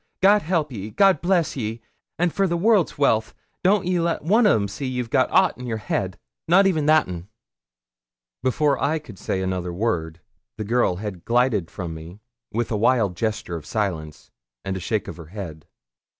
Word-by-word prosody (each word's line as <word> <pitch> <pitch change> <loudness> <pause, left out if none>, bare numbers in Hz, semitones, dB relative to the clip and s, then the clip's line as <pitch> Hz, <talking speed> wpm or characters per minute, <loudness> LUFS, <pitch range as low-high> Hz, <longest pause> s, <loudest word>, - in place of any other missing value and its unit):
God 205 +2 +5
help 160 -4 0
ye; 105 -3 -6
God 195 - +4
bless 175 -2 +1
ye; 115 -3 -3 0.4
an', 175 +1 +1
for 195 +3 +1
the 170 -1 0
world's 205 -1 +3
wealth, 110 -6 +2 0.3
don't 195 0 +3
ye 180 -1 +1
let 170 -2 -1
one 215 +7 +4
o' - - +5
them 100 -2 0
see 115 +8 -5
ye've 125 -2 -3
got - - +3
ought - - +3
in 125 - -6
your 115 -2 -2
head, 95 -2 -2 0.3
not 185 +4 +5
even 160 -6 +1
that 155 0 +5
un.' 90 0 -7 1.1
Before 135 +2 +1
I 150 +3 +2
could 140 - -11
say 95 - -2
another 90 -1 -2
word, 85 -5 -2 0.4
the 110 - -3
girl 115 -3 +1
had 95 -3 -6
glided 115 -7 +1
from 85 -3 -6
me, 80 +5 -10 0.3
with 115 +1 -2
a 110 - +1
wild 110 -4 +2
gesture 110 -4 -2
of 75 - -10
silence, 80 -8 -3 0.3
and 95 -1 -2
a - - -3
shake 105 +3 -2
of - - -7
her 85 -3 -10
head. 85 -5 -8
115 Hz, 195 wpm, -23 LUFS, 95-155 Hz, 1.1 s, God